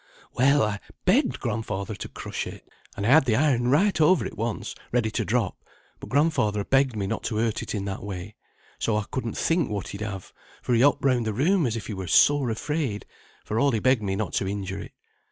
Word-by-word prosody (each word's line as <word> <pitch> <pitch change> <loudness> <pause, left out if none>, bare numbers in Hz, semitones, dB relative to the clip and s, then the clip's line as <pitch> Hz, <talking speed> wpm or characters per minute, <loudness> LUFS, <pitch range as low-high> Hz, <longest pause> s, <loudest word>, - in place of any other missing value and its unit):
"Well, 140 +3 +4
I 105 -1 -1 0.3
begged - - +3
grandfather 105 -1 -3
to 100 - -7
crush - - -5
it, - - -10 0.3
and 100 - -2
I - - +2
had 150 +1 +6
the 115 -4 +2
iron 125 -3 +2
right 160 +7 +3
over 160 +3 +4
it - - -6
once, 115 0 -3 0.2
ready 115 -3 +1
to 115 - -1
drop, 110 -2 -1 0.4
but - - -9
grandfather 130 -9 +2
begged 135 +1 +2
me 100 -2 -2
not 95 - -2
to 110 - -2
hurt 110 0 0
it - - -4
in 100 -1 -3
that 95 -1 -4
way. 100 0 -6 0.5
So 110 -2 +1
I 105 - 0
couldn't 120 -4 -3
think 165 -1 +1
what 100 -3 -4
he'd 100 - -7
have, 100 -3 -6 0.3
for 125 - 0
he 115 - +4
hopped 140 +1 +3
round 125 -4 +2
the 110 - -1
room 165 - +2
as 115 - -2
if 115 - -5
he 110 - -5
were 95 -2 -5
sore 140 - +4
afraid, 125 -1 -2 0.4
for 110 - -1
all 140 - +4
he 110 - +1
begged 130 0 +3
me 95 -2 -1
not 110 +1 -3
to 95 - 0
injure 100 -1 -4
it. - - -9
115 Hz, 225 wpm, -25 LUFS, 105-135 Hz, 0.5 s, had